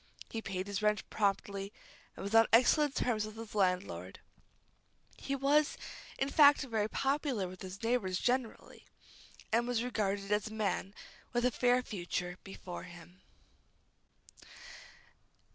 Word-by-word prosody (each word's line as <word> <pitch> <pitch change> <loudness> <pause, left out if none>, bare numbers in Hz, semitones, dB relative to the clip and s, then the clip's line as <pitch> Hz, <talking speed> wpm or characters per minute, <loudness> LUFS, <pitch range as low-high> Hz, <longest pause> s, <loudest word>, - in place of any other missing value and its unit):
He 225 - -3
paid 190 -3 -4
his 200 0 -3
rent 210 -1 +1
promptly, 200 -1 -1 0.5
and - - -6
was 200 +2 -4
on 225 0 +7
excellent 265 +5 +5
terms 225 -4 +1
with 215 +1 -7
his 225 -1 -8
landlord. 180 - -1 1.0
He 275 - -3
was, 285 +2 +2 0.4
in 270 - 0
fact, 285 0 +6
rather 220 -5 -1
popular 270 -7 0
with 185 0 -11
his 190 +3 -8
neighbors 225 -6 +1
generally, 250 -2 -2 0.6
and 235 +2 +2
was 240 -2 0
regarded 205 -4 -2
as 210 +1 +1
a 215 - -8
man 200 -2 -2 0.4
with 240 0 +1
a 250 - +3
fair 250 +1 +2
future 180 -4 -4
before 190 -2 -8
him. 175 +1 -14
215 Hz, 135 wpm, -33 LUFS, 195-245 Hz, 1.0 s, on